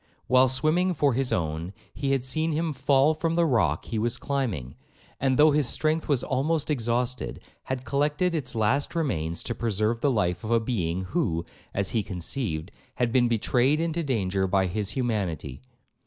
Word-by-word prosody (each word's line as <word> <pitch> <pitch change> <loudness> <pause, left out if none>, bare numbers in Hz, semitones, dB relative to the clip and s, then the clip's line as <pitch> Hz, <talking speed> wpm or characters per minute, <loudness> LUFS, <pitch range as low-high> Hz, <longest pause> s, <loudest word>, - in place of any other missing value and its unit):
While 130 +1 +5
swimming 155 +8 +2
for 145 -2 +2
his 130 +1 0
own, 80 +2 -2 0.2
he 140 -2 -2
had 135 -2 0
seen 155 +5 0
him 160 0 -1
fall 140 +2 +3
from 165 +1 -1
the 170 0 +3
rock 105 - +1
he 115 - -3
was 120 +3 0
climbing, 115 - -2 0.5
and, 130 -1 +1
though 150 +1 +6
his 145 -3 +2
strength 155 +1 0
was 140 -5 +1
almost 150 +4 0
exhausted, 120 -1 -1 0.3
had 130 -1 -4
collected 145 +7 +1
its 135 -6 -2
last 125 +9 +1
remains 85 - -1
to 115 - -2
preserve 110 0 0
the 145 - +3
life 90 -8 0
of 110 - -5
a 115 0 +4
being 95 -7 -2
who, 90 - -1 0.3
as 100 -1 -1
he 115 - +1
conceived, 90 - -3 0.2
had 120 -2 0
been 125 -2 +4
betrayed 125 +5 +2
into 165 0 -1
danger 100 - 0
by 95 0 +2
his 100 +2 -2
humanity. 95 - -2
125 Hz, 175 wpm, -26 LUFS, 100-145 Hz, 0.5 s, though